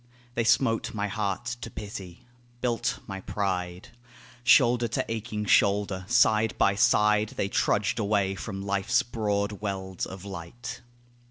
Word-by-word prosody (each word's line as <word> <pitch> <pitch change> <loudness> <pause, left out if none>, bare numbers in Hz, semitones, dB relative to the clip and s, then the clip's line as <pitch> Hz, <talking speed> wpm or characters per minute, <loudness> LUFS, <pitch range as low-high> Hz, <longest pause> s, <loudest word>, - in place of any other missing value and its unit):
They 120 - 0
smote 115 -1 +2
my 105 0 -1
heart 100 0 -2 0.2
to 115 - -5
pity, 100 -5 -8 0.3
built 120 -2 -1
my 95 -2 -6
pride. 90 -3 -3 0.5
Shoulder 120 -1 +5
to - - -1
aching 110 -1 -3
shoulder, 100 -2 +2
side 110 -2 +3
by 100 - +4
side, 105 +1 +3
They 100 - 0
trudged 105 +2 +1
away 100 -2 +1
from 95 0 -6
life's 100 +5 +1
broad 105 -4 -2
wealds 95 -3 -3
of 95 0 -9
light. 100 +6 -7
105 Hz, 135 wpm, -27 LUFS, 95-115 Hz, 0.5 s, Shoulder